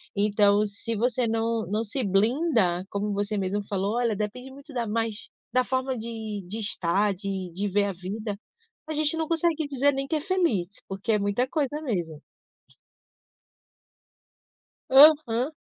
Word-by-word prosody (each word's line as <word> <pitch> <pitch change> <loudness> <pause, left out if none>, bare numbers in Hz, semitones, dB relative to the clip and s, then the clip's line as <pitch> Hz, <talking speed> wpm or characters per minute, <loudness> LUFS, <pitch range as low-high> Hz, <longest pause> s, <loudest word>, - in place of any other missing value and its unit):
Então, 205 0 +3
se 210 +3 -4
você 245 +2 +1
não 225 0 0
não 215 +3 -1
se 250 +4 -1
blinda, 210 - +2
como 205 +1 -2
você 205 +1 -2
mesmo 200 +2 -1
falou: 200 +2 -1
“Olha, 240 -2 +1
depende 215 +6 -4
muito 280 +2 -13
da 240 -2 -1
mas 225 0 -2 0.2
da 255 - +4
forma 260 +1 -1
de 220 -2 -5
de 215 +4 -5
estar, 200 0 +1
de 190 -1 -4
de 205 +3 -2
ver 200 +1 +2
a 200 - -2
vida”, 200 +3 -5 0.5
a 315 - -1
gente 305 +1 +3
não 320 - -1
consegue 325 -2 0
dizer 285 0 +2
nem 275 0 -3
que 315 - -1
é - - +1
feliz, 335 - +1 0.2
porque 195 +4 -3
é 210 - +2
muita 205 +6 0
coisa 295 -1 -1
mesmo. 170 - -3 2.7
Aham. 275 -2 +6
225 Hz, 155 wpm, -26 LUFS, 200-265 Hz, 2.7 s, Aham